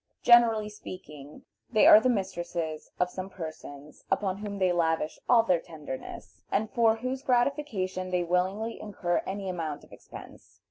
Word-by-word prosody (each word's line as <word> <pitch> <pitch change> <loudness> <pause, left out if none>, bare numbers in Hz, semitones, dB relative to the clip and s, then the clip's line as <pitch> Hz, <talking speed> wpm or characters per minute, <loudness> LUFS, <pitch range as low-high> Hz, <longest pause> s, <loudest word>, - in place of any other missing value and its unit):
Generally 230 -3 +5
speaking, 150 -8 -11 0.3
they 215 -3 +4
are - - +10
the 255 - +1
mistresses 175 -7 -3
of 180 0 +1
some 185 0 -6
persons 155 -4 -9
upon 195 -2 0
whom 205 -1 -6
they 185 -2 +2
lavish 160 -2 0
all 235 -2 +6
their 180 -6 +2
tenderness, 150 -6 -9
and 215 +2 0
for 230 -3 +3
whose 255 +3 -4
gratification 240 -9 0
they 180 -1 0
willingly 190 +6 -1
incur 180 -4 -1
any 195 0 -4
amount 165 -5 -4
of - - -19
expense. - - -13
185 Hz, 150 wpm, -28 LUFS, 170-220 Hz, 0.3 s, are